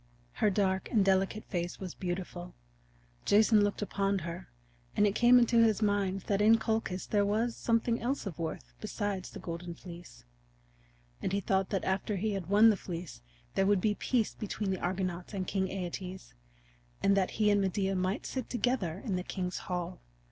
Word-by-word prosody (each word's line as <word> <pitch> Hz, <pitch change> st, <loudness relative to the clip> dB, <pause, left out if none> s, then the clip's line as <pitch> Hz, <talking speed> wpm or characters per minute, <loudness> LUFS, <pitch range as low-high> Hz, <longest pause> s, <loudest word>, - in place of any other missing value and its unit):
Her 215 Hz, -, +2 dB
dark 190 Hz, -1 st, 0 dB
and 210 Hz, -4 st, +3 dB
delicate 195 Hz, +2 st, +1 dB
face 175 Hz, -1 st, -3 dB
was 185 Hz, -3 st, -6 dB
beautiful. 175 Hz, -, -5 dB, 0.7 s
Jason 215 Hz, +1 st, +5 dB
looked 205 Hz, 0 st, 0 dB
upon 200 Hz, -1 st, 0 dB
her, 170 Hz, -, -6 dB, 0.5 s
and 210 Hz, -, +5 dB
it 200 Hz, -, +2 dB
came 240 Hz, +3 st, +6 dB
into 235 Hz, -1 st, +4 dB
his 220 Hz, -1 st, +3 dB
mind 200 Hz, -2 st, +1 dB
that 200 Hz, +2 st, 0 dB
in 220 Hz, +2 st, +6 dB
Colchis 220 Hz, -4 st, -1 dB
there 205 Hz, -1 st, +2 dB
was 220 Hz, +4 st, 0 dB
something 230 Hz, 0 st, +1 dB
else 260 Hz, +3 st, -1 dB
of 180 Hz, -4 st, -6 dB
worth 60 Hz, -, -5 dB
besides 200 Hz, -3 st, -3 dB
the -, -, -9 dB
Golden 170 Hz, 0 st, -6 dB
Fleece. 175 Hz, -, -12 dB, 1.0 s
And -, -, -1 dB
he 200 Hz, -, +1 dB
thought 190 Hz, 0 st, 0 dB
that 195 Hz, -3 st, -1 dB
after 190 Hz, +2 st, 0 dB
he 210 Hz, +3 st, -1 dB
had 195 Hz, -4 st, -3 dB
won 215 Hz, +3 st, +7 dB
the 205 Hz, -, -1 dB
Fleece 170 Hz, -, -7 dB, 0.3 s
there 195 Hz, -, +2 dB
would 205 Hz, -1 st, +4 dB
be 210 Hz, +3 st, +2 dB
peace 230 Hz, +1 st, 0 dB
between 205 Hz, -1 st, -3 dB
the 190 Hz, -, -2 dB
Argonauts 180 Hz, +1 st, -2 dB
and 190 Hz, -1 st, -2 dB
King 190 Hz, -1 st, 0 dB
Æetes, 185 Hz, 0 st, -6 dB, 0.7 s
and 195 Hz, -, +5 dB
that 190 Hz, -2 st, +2 dB
he 210 Hz, -1 st, +4 dB
and 205 Hz, 0 st, +3 dB
Medea 195 Hz, 0 st, 0 dB
might 185 Hz, +2 st, -1 dB
sit 260 Hz, -3 st, -4 dB
together 210 Hz, -8 st, -1 dB
in 195 Hz, -6 st, 0 dB
the 180 Hz, -, -3 dB
king's 180 Hz, -1 st, -3 dB
hall. 175 Hz, -, -3 dB
195 Hz, 185 wpm, -31 LUFS, 185-210 Hz, 1.0 s, won